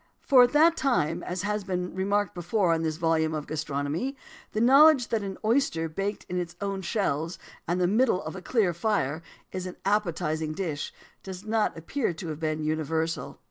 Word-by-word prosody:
For 260 -2 +6
at 245 +2 +4
that 320 +3 +6
time 175 - +1
as 180 +2 -4
has 210 0 -1
been 180 -1 -3
remarked 200 +1 0
before, 175 +1 +1
in 165 - 0
this 160 -1 -1
volume 160 -1 +1
on 150 - -3
gastronomy 155 - -3 0.4
the 215 - -2
knowledge 270 +2 +6
that 225 -2 0
an 195 -1 -5
oyster 220 -9 +2
baked 195 +6 -3
in 180 - -3
his 175 -1 -3
own 195 -1 -3
shells, 170 -4 -1 0.3
in 175 - 0
the 180 - +2
middle 215 +1 +2
of 155 +3 -6
a 190 - -7
clear 200 -3 +1
fire, 170 -5 0 0.3
is 185 0 -4
an 180 - -8
appetising 160 -6 0
dish, 155 -5 -3 0.3
does 190 +1 -8
not 215 -3 0
appear 185 - -2
to 165 +1 -6
have 155 -1 -5
been 155 -1 -2
universal. 160 +1 -2
180 Hz, 185 wpm, -27 LUFS, 160-210 Hz, 0.4 s, For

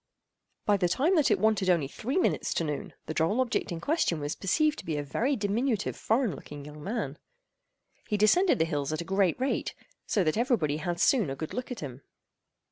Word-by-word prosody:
By 205 -1 +4
the 180 -2 +1
time 300 - +2
that 305 -5 +4
it - - +4
wanted 215 -3 +2
only 170 -6 +3
three 245 - -3
minutes 370 - +1
to - - +1
noon, 150 -2 -4
the - - -4
droll 165 +10 +1
object 250 -5 0
in 170 - -3
question 285 - +1
was 145 0 -2
perceived 305 - +1
to - - -9
be 160 -2 -2
a 145 - -2
very 245 - 0
diminutive 215 +1 0
foreign 225 - +1
looking 145 +1 -10
young 150 0 -10
man. 195 - -3 0.9
He 210 - 0
descended 335 - +4
the 160 - +2
hills 145 -3 -2
at 155 - -2
a - - -6
great 195 0 +1
rate, 265 +2 -1 0.3
so 200 - +2
that 155 +3 0
every 245 +1 +3
body 150 -5 -1
had 170 +2 -3
soon 225 - +3
a 135 - -3
good 160 +3 -6
look 250 0 -4
at 245 - -5
him. 135 -3 -7
195 Hz, 215 wpm, -29 LUFS, 155-245 Hz, 0.9 s, By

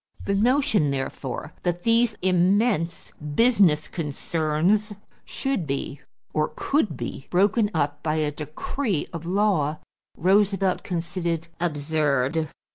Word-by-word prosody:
The 200 - 0
notion, 230 - +3
therefore, 135 -1 -4
that 175 0 -2
these 230 -1 +3
immense 185 -1 +2 0.2
business 195 -10 +4
concerns 165 +6 0 0.3
should 270 - -2
be 140 0 -3 0.3
or 155 0 0
could 220 - 0
be 120 +3 -6
broken 205 +4 +3
up 145 -2 0
by 155 0 0
a 155 -1 0
decree 155 - -3
of 170 0 -6
law, 180 -6 +1 0.4
Roosevelt 195 +1 +2
considered 170 -2 -3
absurd. 150 -2 0
170 Hz, 110 wpm, -25 LUFS, 150-205 Hz, 0.4 s, business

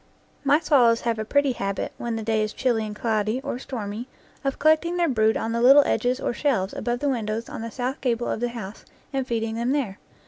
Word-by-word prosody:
My 285 +2 +4
swallows 245 -8 +4
have 230 -2 -1
a 220 - -2
pretty 285 +3 +2
habit, 200 -5 -3
when 235 -1 -2
the 225 - -4
day 220 0 +1
is 215 0 -2
chilly 230 -4 0
and 210 - -7
cloudy 215 +1 0
or 250 - -4
stormy, 225 -2 -5 0.4
of 275 -1 -1
collecting 315 +3 +3
their 345 -1 +2
brood 220 -5 +2
on 225 - -2
the 235 0 0
little 275 +4 +8
ledges 250 +2 0
or - - -1
shelves 235 -9 0
above 240 0 -2
the 290 - +1
win 235 -5 -1
dows 220 +2 -3
on - - -7
the 230 - -4
south 255 +3 -3
gable 240 -2 0
of - - -2
the 245 +1 -1
house 220 -4 -8 0.3
and 265 -1 -1
feeding 225 -2 -1
them 235 +3 0
there. 240 -10 -2
235 Hz, 235 wpm, -24 LUFS, 220-265 Hz, 0.4 s, little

